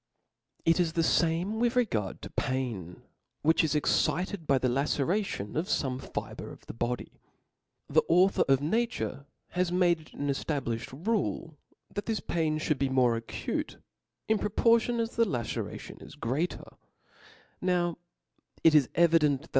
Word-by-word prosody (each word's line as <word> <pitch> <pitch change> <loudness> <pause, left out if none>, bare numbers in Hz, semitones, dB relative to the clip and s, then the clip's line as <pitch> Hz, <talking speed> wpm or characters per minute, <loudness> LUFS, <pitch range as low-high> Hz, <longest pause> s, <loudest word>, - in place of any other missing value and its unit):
It 165 +2 +4
is 165 -3 +1
the 165 - +1
fame 175 +7 +1
with 240 +1 +1
regard 110 - 0
to - - -7
pain; 115 -10 -3 0.4
which 160 +2 +4
is 155 -1 +1
excited 180 +3 +1
by 135 - +4
the 130 - +1
laceration 140 - -1
of 165 +4 -1
fome 130 -2 -1
fibre - - -6
of - - -14
the - - -7
body. 120 +2 -3 0.7
The - - +4
author 185 +3 +5
of 135 0 +4
nature 170 -5 -1 0.2
has 180 -1 0
made 175 -2 +3
it 155 - -18
an 145 - -3
eftablifhcd 135 - -3
rule 200 -7 -1 0.4
fhat 205 - -3
this 225 -2 -1
pain 160 -2 0
(hould 150 -2 0
be 135 0 +1
more 125 -3 +3
acute 115 0 -4 0.5
in 220 -1 +2
pro - - -1
portion 230 +2 +3
as 230 0 -2
the 230 - +5
laceration 120 -4 -4
is - - -11
greater: 140 +10 -3 0.8
now 175 -2 +1 0.6
it 165 - +7
is 150 -4 +5
evident, 155 -5 +4
that? - - -16
160 Hz, 155 wpm, -29 LUFS, 135-185 Hz, 0.8 s, it